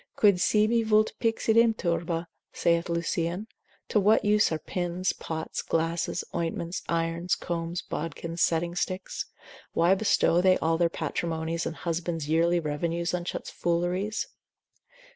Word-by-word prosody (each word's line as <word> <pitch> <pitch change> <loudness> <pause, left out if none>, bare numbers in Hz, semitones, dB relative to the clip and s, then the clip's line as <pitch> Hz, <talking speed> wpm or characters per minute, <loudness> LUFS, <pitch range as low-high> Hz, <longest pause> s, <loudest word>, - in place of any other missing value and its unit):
Quid 200 -3 +5
sibi 215 +4 +3
vult 215 -1 +3
pixidum 230 0 +3
turba, 170 -1 -1 0.3
saith 170 0 +1
Lucian, 170 +3 -1 0.4
to 210 - +2
what 210 +2 +4
use 210 -1 +4
are 160 - 0
pins, 175 +2 -2
pots, 160 -1 -4
glasses, 165 +1 -1
ointments, 170 +1 -2
irons, 170 +1 0
combs, 170 0 -3
bodkins, 165 +1 -4
setting 170 +1 +2
sticks? 185 +1 -3 0.5
why 170 +3 +4
bestow 190 -3 +3
they 185 0 +5
all 165 0 +1
their 170 -1 +3
patrimonies 165 0 -2
and 165 - -4
husbands' 165 -2 -3
yearly 170 +2 +3
revenues 170 +3 -2
on 180 -1 -1
such - - -4
fooleries? 180 +5 -1
170 Hz, 130 wpm, -27 LUFS, 165-185 Hz, 0.5 s, Quid